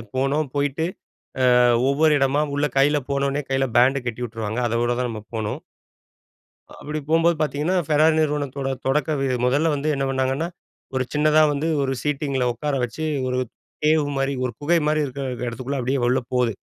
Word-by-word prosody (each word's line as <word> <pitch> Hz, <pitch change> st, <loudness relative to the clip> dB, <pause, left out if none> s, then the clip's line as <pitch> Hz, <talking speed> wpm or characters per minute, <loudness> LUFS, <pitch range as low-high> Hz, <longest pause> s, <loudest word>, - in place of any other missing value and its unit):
போனோம். 135 Hz, +2 st, 0 dB
போயிட்டு, 145 Hz, +3 st, 0 dB, 0.7 s
அ, -, -, +6 dB, 0.3 s
ஒவ்வொரு 150 Hz, +2 st, +3 dB
இடமா 135 Hz, +2 st, +2 dB
உள்ள 145 Hz, +1 st, +1 dB
கைல 145 Hz, +2 st, +4 dB
போன 140 Hz, 0 st, 0 dB
உடனே 145 Hz, +1 st, -2 dB
கைல 135 Hz, 0 st, +1 dB
பேண்ட் 130 Hz, +2 st, +4 dB
கட்டி 120 Hz, +1 st, -3 dB
உட்டுருவாங்க. 110 Hz, 0 st, -4 dB
அதோட 120 Hz, +1 st, 0 dB
தான் 125 Hz, -1 st, -1 dB
நம்ம 110 Hz, -1 st, -6 dB
போனும். 110 Hz, -1 st, -3 dB, 1.2 s
அப்படி 155 Hz, +1 st, -4 dB
போம்போது 165 Hz, +1 st, +3 dB
பார்த்தீங்கன்னா, 150 Hz, +4 st, 0 dB
ஃபெரார் 155 Hz, +1 st, +4 dB
நிறுவனத்தோட 145 Hz, -3 st, -1 dB, 0.2 s
தொடக்க 150 Hz, +3 st, +1 dB
இது 130 Hz, -, 0 dB
முதல 145 Hz, +5 st, +2 dB
வந்து 145 Hz, +2 st, -2 dB
என்ன 135 Hz, 0 st, -1 dB
பண்ணாங்கன்னா? 135 Hz, +4 st, 0 dB, 0.5 s
ஒரு 130 Hz, -, +1 dB
சின்னதா 155 Hz, +1 st, +4 dB
வந்து 150 Hz, +3 st, -2 dB, 0.2 s
ஒரு 135 Hz, 0 st, -1 dB
சீட்டிங்கில 140 Hz, -3 st, -1 dB
உட்கார 145 Hz, +5 st, -3 dB
வச்சி 155 Hz, +7 st, -5 dB, 0.2 s
ஒரு 125 Hz, 0 st, 0 dB, 0.5 s
கேவ் 155 Hz, -1 st, +3 dB
மாதிரி, 135 Hz, +1 st, 0 dB
ஒரு 125 Hz, -, -2 dB
குகை 165 Hz, +3 st, +2 dB
மாரி 155 Hz, 0 st, +2 dB
இருக்கிற 140 Hz, +1 st, -5 dB, 0.2 s
இடத்துக்குள்ள 130 Hz, +4 st, -4 dB
அப்டியே 130 Hz, +1 st, -1 dB
உள்ள 130 Hz, +1 st, +2 dB
போது. 125 Hz, -2 st, +2 dB
140 Hz, 165 wpm, -23 LUFS, 130-150 Hz, 1.2 s, அ